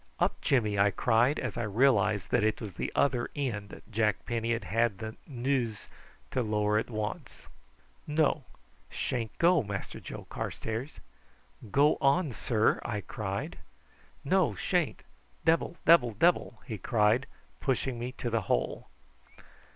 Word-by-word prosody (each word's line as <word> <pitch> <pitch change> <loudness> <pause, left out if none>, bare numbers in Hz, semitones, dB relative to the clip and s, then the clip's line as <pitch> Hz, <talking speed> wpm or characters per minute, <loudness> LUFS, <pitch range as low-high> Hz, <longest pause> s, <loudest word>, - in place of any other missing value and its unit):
"Up, - - 0
Jimmy!" 105 -6 +2
I 100 +1 +5
cried, 120 +7 +2
as 130 -4 -3
I - - -1
realised 105 -3 +2
that 125 - +3
it 110 0 +1
was 105 -5 -6
the - - -3
other 130 -4 +2
end 110 -8 -4
Jack 105 -4 0
Penny 115 -1 -1
had 115 -1 -1
had 110 +3 +1
the 110 +1 -6
nous 125 -4 -1 0.5
to 130 - 0
lower 105 -1 +1
at 110 - -4
once. 110 -2 -5 0.6
"No: 150 -1 +2 0.5
sha'n't 115 -3 -3
go, 170 -1 +5
Mass 100 -2 -4
Joe - - -8
Carstairs." 115 +6 -5 0.7
"Go 145 +8 +4
on, 140 +3 +3
sir," 110 0 +1
I 105 -3 -3
cried. 100 -1 -4 0.6
"No - - +2
sha'n't! - - 0 0.4
Debble 165 +1 +2
debble 125 -10 +6
debble!" 170 - +2
he 110 -3 -5
cried, 115 +5 +2 0.3
pushing 130 -2 -1
me 120 +2 -3
to 120 -3 -4
the 115 0 +1
hole. - - 0
115 Hz, 140 wpm, -30 LUFS, 105-135 Hz, 0.7 s, debble